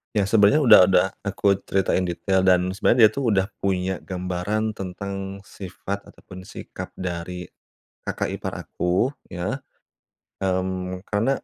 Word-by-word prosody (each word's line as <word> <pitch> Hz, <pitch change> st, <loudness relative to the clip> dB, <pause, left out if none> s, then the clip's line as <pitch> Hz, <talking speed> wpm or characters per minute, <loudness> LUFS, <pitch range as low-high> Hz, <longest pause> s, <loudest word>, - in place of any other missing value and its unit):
Ya, 105 Hz, -, +3 dB
sebenarnya 110 Hz, +7 st, +5 dB
udah 125 Hz, -, +9 dB
udah 90 Hz, -1 st, +4 dB, 0.2 s
aku 100 Hz, 0 st, +2 dB
ceritain 95 Hz, -1 st, +1 dB
detail 95 Hz, +2 st, 0 dB
dan 90 Hz, -1 st, +3 dB
sebenarnya 110 Hz, +5 st, +2 dB
dia 110 Hz, -, +9 dB
tuh 140 Hz, -, -3 dB
udah 95 Hz, +2 st, +1 dB
punya 95 Hz, -1 st, -1 dB
gambaran 95 Hz, +4 st, -2 dB
tentang 95 Hz, 0 st, -6 dB
sifat 100 Hz, +1 st, -7 dB
ataupun 95 Hz, -1 st, -13 dB
sikap -, -, -8 dB
dari 90 Hz, 0 st, -4 dB, 0.6 s
kakak -, -, -2 dB
ipar -, -, -5 dB
aku, 90 Hz, +6 st, 0 dB, 0.2 s
ya. 95 Hz, +10 st, -3 dB, 0.8 s
Mmm, 95 Hz, 0 st, -2 dB
karena 110 Hz, +5 st, +1 dB
95 Hz, 130 wpm, -24 LUFS, 90-100 Hz, 0.8 s, udah